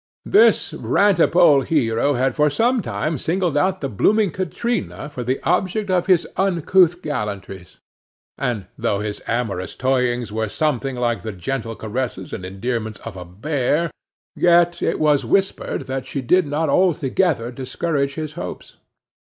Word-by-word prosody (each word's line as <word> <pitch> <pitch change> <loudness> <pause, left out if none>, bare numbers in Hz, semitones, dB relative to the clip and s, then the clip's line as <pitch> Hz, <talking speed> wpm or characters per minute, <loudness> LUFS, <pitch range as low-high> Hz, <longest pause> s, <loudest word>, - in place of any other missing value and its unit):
This 425 +4 +4
rantipole 180 -7 +4
hero 135 -1 +1
had 130 +1 +1
for 150 +3 +3
some 235 - +1
time 155 -5 -2
singled 175 0 0
out 185 +5 +1
the 140 - -1
blooming 200 - +2
Katrina 185 0 -3
for 140 -4 -6
the 130 +3 -1
object 195 +1 0
of 180 -1 +1
his 180 -3 +3
uncouth 180 -1 +3
gallantries, 100 - -5 0.6
and 115 -6 -2
though 100 0 0
his 105 -1 -4
amorous 115 -6 -2
toyings 125 -3 0
were 110 0 -2
something 135 -1 -1
like 120 -1 -1
the 110 - -5
gentle 115 +5 -4
caresses 110 -4 -4
and - - -5
endearments 110 +3 -3
of 115 -3 -8
a 90 -1 -8
bear, 145 - -1 0.4
yet 175 0 +3
it - - 0
was 150 -2 +3
whispered 195 0 0
that 130 -1 -4
she 140 - -4
did 180 +6 +3
not 150 +3 -1
altogether 160 -6 +1
discourage 140 +2 -2
his 155 -2 -5
hopes. - - -8
140 Hz, 145 wpm, -21 LUFS, 115-175 Hz, 0.6 s, This